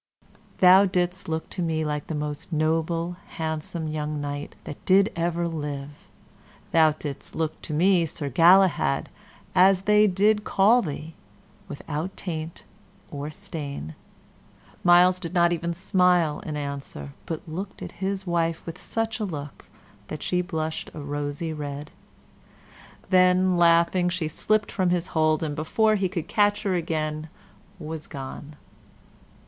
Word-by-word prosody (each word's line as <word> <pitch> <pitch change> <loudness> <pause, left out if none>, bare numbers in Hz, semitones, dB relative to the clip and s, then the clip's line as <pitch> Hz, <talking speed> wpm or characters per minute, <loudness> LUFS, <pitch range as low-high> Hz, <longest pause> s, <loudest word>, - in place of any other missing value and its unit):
"Thou 185 +2 +8
didst 180 -1 -1
look 160 0 -2
to 180 - -4
me 160 -2 0
the 150 +1 -3
most 150 +2 -5
noble, 165 +2 0 0.2
handsome 160 0 -3
young 150 -1 -3
knight 145 0 -5
that 145 - -9
did 195 +2 +4
ever 170 0 0
live; 145 -3 -6 0.6
thou 160 -2 +5
didst 145 -2 -7
look 160 -1 -2
to - - -7
me 170 +2 +3
Sir 145 -1 -4
Galahad, 170 0 +4 0.4
as 185 +1 +5
they 210 +1 +5
did 210 +3 +2
call 215 +6 +4
thee, 155 -2 -6 0.5
withouten 155 +5 -5
taint 160 -2 -6 0.5
or 145 0 -5
stain." 150 - -6 0.9
Myles 180 +1 +6
did 180 0 -6
not 175 0 +4
even 170 0 -2
smile 180 -3 +2
in 150 -1 -5
answer, 140 - -6
but 160 0 -5
looked 190 +5 -6
at - - -7
his 190 0 -2
wife 165 -2 -1
with 165 +1 -8
such 225 0 -2
a - - -1
look 150 -8 -6 0.4
that 155 - -6
she 180 0 +1
blushed 160 -3 -3
a - - -6
rosy 145 +2 -3
red. 145 -1 -6 1.2
Then, 185 0 +4
laughing, 170 +1 +4
she 175 -3 -2
slipped 215 +7 0
from 185 -2 +1
his 175 0 0
hold, 155 -1 +2
and 150 -2 -2
before 215 +8 +2
he 195 -3 +1
could 170 -3 -4
catch 205 -1 +2
her 195 -3 0
again 155 -2 -2 0.5
was 160 -2 -6
gone. 140 +1 -8
165 Hz, 140 wpm, -25 LUFS, 150-185 Hz, 1.2 s, Thou